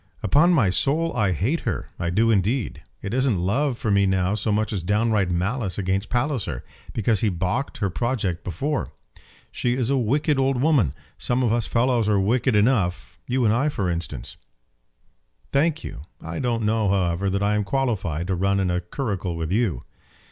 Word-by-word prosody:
"Upon 165 +5 +4
my 125 - +3
soul 155 - +1
I 100 -3 +2
hate 110 - 0
her. - - -4
I 85 - -1
do 110 +6 +3
indeed. 110 +4 0 0.2
It 100 - -4
isn't 130 -5 +2
love 120 +9 0
for 110 - -1
me 100 0 +4
now 95 0 +1
so 105 +1 -1
much 110 +1 0
as 95 - -2
downright 105 +1 +1
malice 95 +4 -1
against 95 0 -1
Palliser, 120 - -1 0.3
because 110 -1 +1
he 110 - +2
baulked 95 +9 -2
her 100 -2 -1
project 100 -6 -1
before. 135 - -2 0.6
She 120 0 0
is 125 0 0
a 140 - +2
wicked 145 +5 +1
old 135 -1 +1
woman. 135 - +2 0.2
Some 125 +1 +1
of 115 -2 +2
us 120 -3 0
fellows 120 -2 +2
are 105 -2 +3
wicked 115 +5 +2
enough 105 -5 +1
you 125 0 +1
and 110 - +4
I 135 +6 +2
for 95 -10 -1
instance 85 0 -5 0.6
" - - -42
"Thank 155 +3 +2
you. - - -7 0.2
I 85 +1 -6
don't 120 -3 0
know, 110 -1 +1
however, 95 -1 +1
that 100 +1 0
I 105 +1 +2
am 105 0 +1
qualified 100 - -1
to 95 - -1
run 100 +2 +1
in 95 -2 +1
a 90 0 0
curricle 95 - -3
with 80 0 -3
you." 100 - 0
105 Hz, 190 wpm, -24 LUFS, 95-125 Hz, 0.6 s, Upon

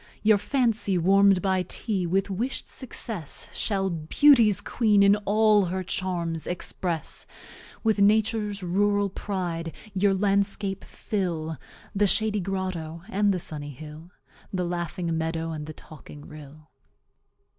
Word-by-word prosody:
Your 215 -1 +5
Fancy, 225 -6 +1
warm'd 195 +1 +4
by 190 -1 +2
TEA, 185 +1 -2
with 195 +3 0
wish'd 235 +8 -3
success, 220 - -4
Shall 195 -3 0
Beauty's 210 - +4
Queen 210 -4 +2
in 200 +1 +6
all 210 -1 +4
her 185 +1 -3
Charms 170 -3 -2
express; 175 -2 -2 0.6
With 220 -2 +2
Nature's 210 -1 +2
Rural 200 +2 +1
Pride 175 -5 -4 0.2
your 195 0 +2
Landscape 200 0 0
fill 165 -7 -3 0.3
The 205 +1 +3
Shady 215 +1 +1
Grotto, 180 -4 -4
and 205 -1 +2
the 190 - 0
Sunny 150 -4 -4
Hill, 155 +4 -10 0.4
The 185 -3 -1
Laughing 175 -1 -3
Meadow, 165 0 -2
and 155 -1 -6
the 155 - -7
Talking 150 -1 -13
Rill. 150 0 -13
190 Hz, 125 wpm, -26 LUFS, 165-205 Hz, 0.6 s, in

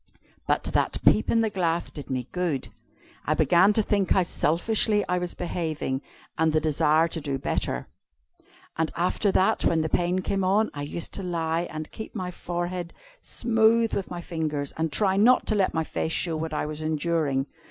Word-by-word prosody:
But - - +1
that - - +1
peep - - +4
in 230 - +3
the 220 - +1
glass 170 -3 -1
did 145 - -9
me 130 -2 -2
good. 175 -7 -2 0.6
I 155 - +1
began 170 +6 +5
to 220 - +2
think 200 -2 +1
how 190 - +4
selfishly 205 +6 +1
I 180 - +1
was 175 -1 -4
behaving, 160 -6 -3 0.4
and 160 0 +3
to 155 - +4
desire 155 +1 +3
to 165 - -4
do 140 -2 -2
better. 135 - -2 0.9
And 160 -1 +1
after 185 +4 +1
that, 185 - +2
when 165 -1 +2
the 155 - -1
pain 180 +3 +1
came 195 0 -1
on, 205 +4 +2
I 145 - -6
used 150 +4 -5
to - - -3
lie 170 -2 -1
and 155 0 -6
keep 220 - -8
my 185 -3 -3
forehead 175 0 -4 0.3
smooth 225 0 +2
with 195 - -2
my 175 -1 -5
fingers, 155 -5 -3
and 160 -1 -1
try 190 +2 +2
not 245 +5 +5
to - - +1
let 195 -4 +1
my 160 - +1
face 160 +1 -3
show 165 -3 0
what 160 0 -3
I 150 - -1
was 155 0 -4
enduring. 155 -3 0
170 Hz, 190 wpm, -26 LUFS, 155-190 Hz, 0.9 s, began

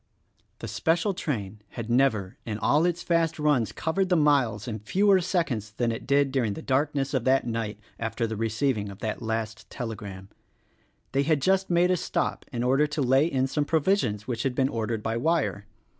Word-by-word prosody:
The - - -7
special 170 +5 +1
train 110 - -4 0.2
had 115 -2 -4
never 115 -5 +2
in 110 -2 -4
all 145 +9 +3
its 175 0 -2
fast 165 -1 +1
runs 145 -7 +2
covered 185 +4 -1
the 180 - +4
miles 135 - +2
in 110 -2 -4
fewer 190 - +3
seconds 135 - -1
than 120 +1 0
it 115 - -6
did 140 0 +3
during 120 -6 0
the - - -8
darkness 140 0 0
of 130 -4 +1
that 135 +1 +3
night 115 -3 -3 0.2
after 115 +1 -2
the 110 0 -3
receiving 115 0 -1
of 100 - -9
that 110 +1 -3
last 110 -1 -3
telegram. 100 -5 -6 0.8
They 135 - +2
had 150 +1 +2
just 190 +6 +2
made 175 +1 +3
a 180 - +2
stop - - -2
in 120 -2 -2
order 135 +4 +3
to 150 0 -3
lay 135 +4 +4
in 130 -5 +1
some 145 +2 0
pro 160 +2 +2
visions 130 - 0
which 120 -3 -2
had 130 -1 -1
been 135 0 +2
ordered 115 -2 -2
by 115 +1 -1
wire. 135 -7 0
130 Hz, 195 wpm, -26 LUFS, 110-150 Hz, 0.8 s, the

